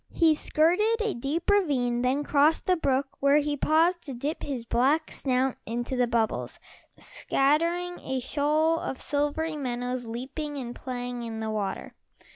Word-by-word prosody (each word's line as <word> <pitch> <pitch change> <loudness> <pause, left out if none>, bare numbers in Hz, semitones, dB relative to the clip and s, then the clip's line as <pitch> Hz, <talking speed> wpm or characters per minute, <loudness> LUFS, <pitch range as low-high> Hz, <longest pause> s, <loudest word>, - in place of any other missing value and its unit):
He 325 -2 +4
skirted 360 +10 +2
a 440 -1 0
deep 275 +7 -3
ravine, 275 -12 +2
then 260 +4 +1
crossed 295 +2 +3
the 365 - +3
brook 275 -4 0
where 280 +1 +4
he 295 0 0
paused 330 +5 +2
to 275 -4 -6
dip 285 +6 -3
his 255 -5 -4
black 280 +7 +2
snout 260 -1 0
into 240 +3 -3
the 250 -1 +2
bubbles, 230 -2 -1 0.4
scattering 335 +6 0
a 265 0 -3
shoal 305 +5 +1
of 265 - -4
silvery 295 +2 -1
minnows 250 -3 -3
leaping 280 +6 -5
and 245 -3 -5
playing 245 -1 -5
in 225 -1 -5
the 220 0 -3
water. 200 -3 -3
280 Hz, 155 wpm, -27 LUFS, 245-315 Hz, 0.4 s, He